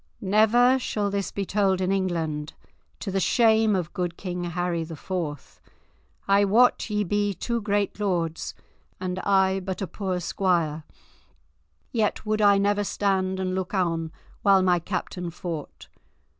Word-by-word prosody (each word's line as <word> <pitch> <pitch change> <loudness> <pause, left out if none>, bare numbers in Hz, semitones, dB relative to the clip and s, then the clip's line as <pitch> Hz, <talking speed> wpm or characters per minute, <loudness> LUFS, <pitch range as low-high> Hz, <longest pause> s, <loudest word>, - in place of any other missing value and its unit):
"Never 225 +6 +4
shall 205 -5 -2
this 200 -1 -2
be 200 - -3
told 195 -1 +1
in 185 0 0
England, 165 -6 -1 0.5
to 195 - -3
the 195 - 0
shame 220 +1 +3
of 175 -3 -3
good 175 -3 -3
King 180 -2 -4
Harry 175 -1 -1
the 160 0 -7
Fourth. 155 -4 -5 0.7
I 200 +1 +5
wot 230 +4 +3
ye 210 0 0
be 205 +1 0
two 235 +6 -2
great 205 0 -1
lords, 170 -5 -2 0.4
and 185 0 -3
I 190 -1 +2
but 190 0 -5
a 195 - -2
poor 185 0 -3
squire, 170 -4 0 1.1
yet 220 -2 0
would 215 0 0
I 200 -1 +6
never 205 +1 +2
stand 190 -2 0
and 185 -1 -1
look 190 +1 -3
on 165 -3 0 0.3
while 195 -2 +5
my 180 -1 +3
captain 180 0 -4
fought. 160 - -7
190 Hz, 150 wpm, -25 LUFS, 175-205 Hz, 1.1 s, I